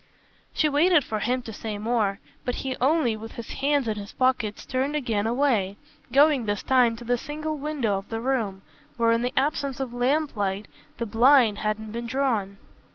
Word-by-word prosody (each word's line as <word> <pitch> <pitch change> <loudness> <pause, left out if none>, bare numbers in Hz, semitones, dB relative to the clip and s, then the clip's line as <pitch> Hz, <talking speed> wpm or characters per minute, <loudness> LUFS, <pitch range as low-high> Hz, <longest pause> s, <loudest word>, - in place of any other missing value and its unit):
She 310 - +2
waited 300 +2 +4
for 215 -3 -3
him 250 +4 -1
to 225 - -8
say 210 0 -5
more, 210 -2 0 0.2
but 250 - -2
he 260 -1 -1
only, 270 -4 +3
with 225 +1 -9
his 235 - -8
hands 280 -2 +1
in 215 -1 -1
his 200 -1 -8
pockets, 255 -5 0
turned 265 +4 -1
again 225 -7 0
away, 230 -6 +1 0.3
going 280 -4 +4
this 205 -1 -1
time 250 -3 +3
to 235 - -10
the 245 0 0
single 305 +3 -4
window 275 -9 -1
of 195 - -14
the 225 - -3
room, 225 -6 -1 0.3
where 230 -1 +3
in 230 0 +2
the 250 +1 -1
absence 280 -1 0
of 260 -3 -4
lamplight 245 -7 0 0.3
the 235 - -2
blind 230 -1 +4
hadn't 215 0 -2
been 235 +1 -4
drawn. 230 -7 -1
240 Hz, 185 wpm, -25 LUFS, 215-275 Hz, 0.3 s, waited